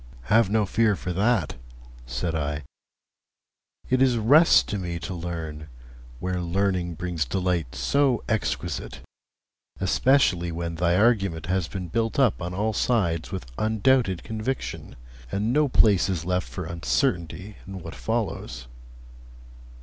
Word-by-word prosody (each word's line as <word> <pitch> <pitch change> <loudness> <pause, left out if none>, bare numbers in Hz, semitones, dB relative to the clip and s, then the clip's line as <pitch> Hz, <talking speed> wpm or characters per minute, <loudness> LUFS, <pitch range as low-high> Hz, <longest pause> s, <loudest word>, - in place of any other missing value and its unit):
'Have 110 - +3
no 110 0 +2
fear 110 +1 +2
for 90 -1 -4
that,' 105 - +1 0.5
said 65 +6 -2
I. 75 -2 -2 1.2
'It 130 0 +2
is 130 -3 +4
rest 145 +10 +6
to 105 - -2
me 85 -2 -3
to 85 +3 -5
learn, 80 -3 -5 0.5
where 90 +2 -2
learning 90 -1 0
brings 85 -2 -2
delight 85 -1 -1
so 140 -4 +2
exquisite, 90 - -2 0.8
especially 95 -4 +2
when 85 0 -4
thy 85 +1 +2
argument 100 -6 +2
has 90 -1 0
been 95 -2 -5
built 115 +6 -1
up 130 -10 +3
on 85 +1 -3
all 105 +4 -1
sides 85 -9 0
with 95 -6 -5
undoubted 110 -3 +2
conviction, 115 +3 -4 0.4
and 105 +4 0
no 150 +1 +3
place 105 -7 +4
is 85 -4 -2
left 90 0 -1
for 90 - -5
uncertainty 85 - -1
in 95 -1 -6
what - - -7
follows.' - - -3
90 Hz, 135 wpm, -25 LUFS, 85-110 Hz, 1.2 s, rest